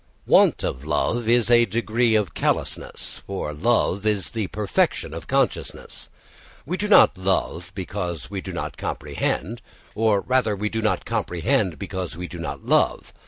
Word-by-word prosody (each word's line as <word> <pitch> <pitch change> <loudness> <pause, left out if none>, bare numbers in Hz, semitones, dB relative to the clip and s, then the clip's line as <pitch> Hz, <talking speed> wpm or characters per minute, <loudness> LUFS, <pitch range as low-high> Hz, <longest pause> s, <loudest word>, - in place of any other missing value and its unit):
Want - - +4
of 65 - -3
love 110 +10 0
is 120 0 +3
a 120 0 +6
degree 115 +2 +1
of 105 -6 +1
callousness; - - -2
for 95 -6 -4
love 100 +2 +1
is 105 -3 0
the 110 -4 -2
perfection 105 -2 0
of - - -7
consciousness. - - -2 0.6
We 170 +6 -2
do 205 +2 -2
not 150 - +6
love 95 -2 -1
because 90 -4 -4
we - - -5
do - - -7
not - - -5
comprehend, 80 +9 -3 0.3
or 110 -2 +2
rather 125 -4 +1
we 105 +2 -2
do 110 +1 -2
not 105 -4 0
comprehend 90 - 0
because 95 -4 -5
we 90 0 -5
do 85 - -9
not 70 -4 -6
love. - - +1
100 Hz, 160 wpm, -23 LUFS, 90-115 Hz, 0.6 s, a